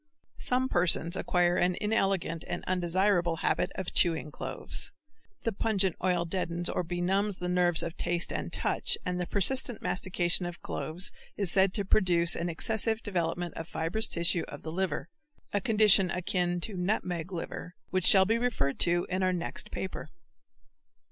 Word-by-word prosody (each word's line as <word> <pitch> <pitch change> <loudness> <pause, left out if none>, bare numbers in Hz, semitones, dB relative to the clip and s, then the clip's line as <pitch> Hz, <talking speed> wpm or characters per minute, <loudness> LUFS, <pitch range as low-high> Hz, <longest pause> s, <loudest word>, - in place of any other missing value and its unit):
Some 255 +1 0
persons 175 -5 +2
acquire 175 -1 +1
an 180 0 +2
inelegant 195 -6 0
and - - -4
undesirable 180 -1 +1
habit 180 +2 0
of 190 -2 -5
chewing 160 -3 +2
cloves. - - -3 0.5
The 230 - 0
pungent 195 -3 +1
oil 180 -2 +1
deadens 175 0 -2
or - - -1
benumbs 185 +3 -1
the 180 - -4
nerves 180 -2 +2
of 170 - -5
taste 175 0 -1
and - - -4
touch - - +1
and 180 0 -2
the 175 - -3
persistent 240 +3 0
mastication 180 -1 0
of 175 0 -9
cloves, 175 +4 -3 0.3
is 195 -4 0
said 195 -1 +4
to 200 - -1
produce 175 -4 +3
an 170 +1 -2
excessive 220 +6 0
development 175 -3 -2
of 165 - -7
fibrous 165 +8 0
tissue 170 0 +1
of - - -10
the 160 - -5
liver, 175 -3 -2 0.5
a 205 - +1
condition 210 -3 +5
akin 175 0 -1
to 215 - -5
"nutmeg 180 -2 -2
liver" 180 0 -6 0.2
which 185 -1 +2
shall 190 -1 +9
be 225 +4 +1
referred 200 - -1
to 175 0 +3
in 185 +1 -2
our 185 0 +2
next 170 -1 -4
paper. 190 - -6
180 Hz, 160 wpm, -29 LUFS, 175-195 Hz, 0.5 s, shall